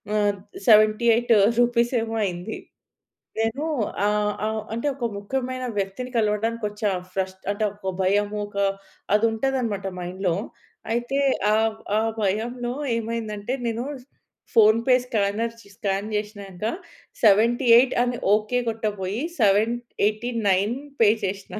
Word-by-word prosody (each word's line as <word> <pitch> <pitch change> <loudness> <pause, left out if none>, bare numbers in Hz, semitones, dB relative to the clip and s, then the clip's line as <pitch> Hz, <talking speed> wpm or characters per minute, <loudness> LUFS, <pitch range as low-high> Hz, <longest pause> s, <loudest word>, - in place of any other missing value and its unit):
ఆహ్, 205 -1 +2 0.3
78 225 +2 +5 0.3
రూపీస్ 240 0 +3
ఏమో 225 0 -4
అయింది. 180 +3 -4 0.8
నేను 225 +6 -1 0.4
ఆహ్, 210 0 +1
ఆహ్, 220 0 -1
అంటే 235 +6 -2
ఒక 245 - -3
ముఖ్యమైన 255 +4 -3
వ్యక్తిని 200 +6 -3
కలవడానికి 225 +2 0
వచ్చా 210 0 -2 0.2
ఫ్రస్ట్ 190 0 -3
అంటే 205 +1 -2
ఒక 190 -2 -4
భయము 205 +2 +1
ఒక 200 - -11 0.6
అది 215 +2 +3
ఉంటదనమాట 225 -4 -1
మైండ్‌లో. 180 0 -2 0.6
అయితే 240 +4 -1 0.3
ఆహ్, 220 0 +1 0.2
ఆ - - +1 0.2
భయంలో 240 +5 -1 0.2
ఏమైందంటే 225 0 -3
నేను 230 +2 -2 0.7
ఫోన్‌పే 230 +3 +5
స్కానర్ 225 -1 -1
స్ - - -18
స్కాన్ 200 +1 -1
చేశినంక 205 -2 -5 0.6
78 235 +4 +5
అని 245 -1 -2 0.2
ఓకే 215 +4 0
కొట్టబోయి 210 +1 -3 0.2
789 215 0 +1 0.3
పే 215 - +7 0.2
చేష్నా. 195 +2 -5
220 Hz, 110 wpm, -24 LUFS, 205-235 Hz, 0.8 s, పే